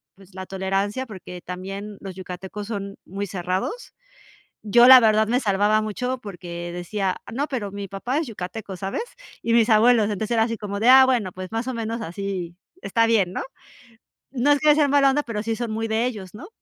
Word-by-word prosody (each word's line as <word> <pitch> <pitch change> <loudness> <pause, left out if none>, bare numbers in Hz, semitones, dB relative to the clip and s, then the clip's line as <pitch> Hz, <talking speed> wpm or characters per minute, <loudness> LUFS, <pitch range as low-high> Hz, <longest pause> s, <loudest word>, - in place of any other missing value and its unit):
pues, 195 0 -19
la 190 0 -7
tolerancia, 195 +6 -2
porque, 185 -5 -10
también 195 +3 -7
los 190 -2 -8
yucatecos 190 +2 -7
son 200 -3 -5
muy 200 +2 -5
cerrados. 185 - -3 0.7
Yo 235 +3 +6
la 260 -1 +11
verdad 220 -1 +4
me 245 +3 +2
salvaba 210 -1 +2
mucho 250 +5 -3
porque, 175 -5 -7
decía: 185 +2 -2 0.2
"No, 275 +5 -1
pero 235 -8 -3
mi 200 -1 -6
papá 240 +9 -2
es 320 - -2
yucateco, 200 -2 -7
¿sabes? 195 - -3 0.4
Y 230 - 0
mis 230 -1 +4
abuelos", 220 0 +5
entonces 210 +3 -3
era 225 - +3
así 230 0 -3
como 200 0 -5
de: 230 - +3
"Ah, 265 0 +9
bueno, 235 -8 0
pues, 185 +1 -8
más 225 +2 -2
o - - -1
menos 230 0 -3
así 185 -2 -5 0.3
está 230 +3 +2
bien", 205 -6 +2
¿no? - - -3 0.9
No, 275 +2 +2
es 290 - +2
que 300 -1 +5
sean 295 -2 +2
mala 280 -1 +5
onda, 295 +2 +1
pero, 215 -3 -4
sí 225 0 -2
son 235 0 -3
muy 225 +1 -2
de 220 +2 +1
ellos, 205 -7 -6
¿no? 290 - -10
210 Hz, 200 wpm, -23 LUFS, 195-235 Hz, 0.9 s, la